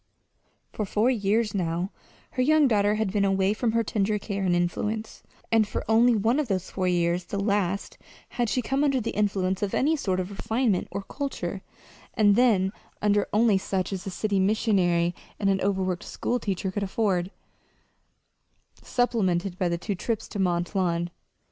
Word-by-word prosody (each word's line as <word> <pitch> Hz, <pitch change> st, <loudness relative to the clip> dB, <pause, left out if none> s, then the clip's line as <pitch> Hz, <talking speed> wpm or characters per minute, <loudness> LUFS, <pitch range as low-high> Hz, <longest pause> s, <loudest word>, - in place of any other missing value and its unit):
For 215 Hz, -, -2 dB
four 215 Hz, +5 st, +2 dB
years 215 Hz, -1 st, +1 dB
now 175 Hz, 0 st, -1 dB, 0.4 s
her 255 Hz, -, -1 dB
young 305 Hz, +2 st, +5 dB
daughter 205 Hz, -3 st, +2 dB
had 215 Hz, -3 st, -1 dB
been 205 Hz, -2 st, +2 dB
away 195 Hz, 0 st, +2 dB
from 225 Hz, 0 st, -1 dB
her 230 Hz, 0 st, +2 dB
tender 210 Hz, 0 st, 0 dB
care 200 Hz, -1 st, -4 dB
and 180 Hz, -2 st, +2 dB
influence; 210 Hz, +5 st, -2 dB, 0.3 s
and 225 Hz, -2 st, +4 dB
for -, -, -4 dB
only 230 Hz, +2 st, +5 dB
one 225 Hz, +6 st, +2 dB
of 300 Hz, -, -1 dB
those 190 Hz, -3 st, -2 dB
four 185 Hz, -1 st, -1 dB
years 175 Hz, 0 st, +1 dB
the 200 Hz, -, -4 dB
last 200 Hz, -2 st, -1 dB, 0.3 s
had 240 Hz, -1 st, -1 dB
she 250 Hz, -, 0 dB
come 270 Hz, +4 st, 0 dB
under 275 Hz, -3 st, +2 dB
the 230 Hz, -, -3 dB
influence 195 Hz, -2 st, 0 dB
of 205 Hz, -2 st, -1 dB
any 305 Hz, +4 st, +2 dB
sort 190 Hz, -11 st, -1 dB
of 185 Hz, +2 st, -3 dB
refinement 220 Hz, 0 st, 0 dB
or 200 Hz, -, -5 dB
culture, 280 Hz, +6 st, -4 dB, 0.5 s
and 205 Hz, -3 st, +5 dB
then 210 Hz, -6 st, +3 dB, 0.3 s
under 205 Hz, -1 st, +2 dB
only 215 Hz, -2 st, +4 dB
such 190 Hz, 0 st, -2 dB
as 190 Hz, 0 st, -5 dB
a -, -, -1 dB
city 200 Hz, +2 st, -1 dB
missionary 190 Hz, -4 st, +2 dB, 0.3 s
and 195 Hz, -1 st, +2 dB
an 190 Hz, -, 0 dB
overworked 190 Hz, -2 st, 0 dB
schoolteacher 200 Hz, -6 st, -2 dB
could 205 Hz, -, -3 dB
afford, 190 Hz, -3 st, 0 dB, 1.5 s
supplemented 195 Hz, -7 st, 0 dB
by 180 Hz, -, +1 dB
the 170 Hz, -, 0 dB
two 200 Hz, -, -3 dB
trips 220 Hz, +4 st, -3 dB
to 205 Hz, -, -5 dB
Mont 175 Hz, -1 st, 0 dB
Lawn. 175 Hz, -3 st, 0 dB
200 Hz, 175 wpm, -26 LUFS, 185-225 Hz, 1.5 s, young